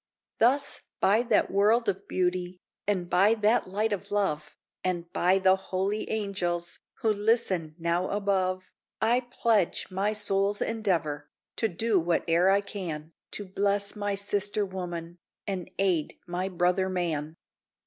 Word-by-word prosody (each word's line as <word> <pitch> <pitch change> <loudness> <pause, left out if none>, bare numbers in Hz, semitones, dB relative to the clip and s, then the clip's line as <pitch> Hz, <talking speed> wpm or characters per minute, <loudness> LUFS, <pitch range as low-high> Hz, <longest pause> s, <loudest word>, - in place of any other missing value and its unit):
Thus 275 +5 +2 0.2
by 210 +4 +4
that 235 -3 +2
world 215 +4 +3
of 200 0 -2
beauty, 180 0 -1 0.3
And 185 -4 0
by 200 +6 +4
that 215 0 +2
life 210 +4 0
of 205 - -3
love, 180 -7 -1 0.3
And 175 -2 -2
by 185 +2 +3
the 190 0 +5
holy 190 +2 -2
angels 185 -5 -2 0.2
Who 220 -1 +4
listen 200 -7 +1
now 170 +2 0
above, 190 -2 0 0.3
I 240 +2 +2
pledge 220 -7 +1
my 195 +3 0
soul's 205 -1 +1
endeavor, 165 -10 -1 0.3
To 225 - +2
do 215 +2 +1
whate'er 170 +1 +2
I 200 +1 +4
can 165 -6 -6 0.2
To 205 - -4
bless 200 +1 0
my 205 -1 -1
sister 205 +1 0
woman, 175 -2 -6 0.3
And 190 -3 -4
aid 180 -6 0
my 180 +2 -2
brother 180 +1 +1
man. 165 -4 -2
190 Hz, 140 wpm, -28 LUFS, 175-205 Hz, 0.3 s, the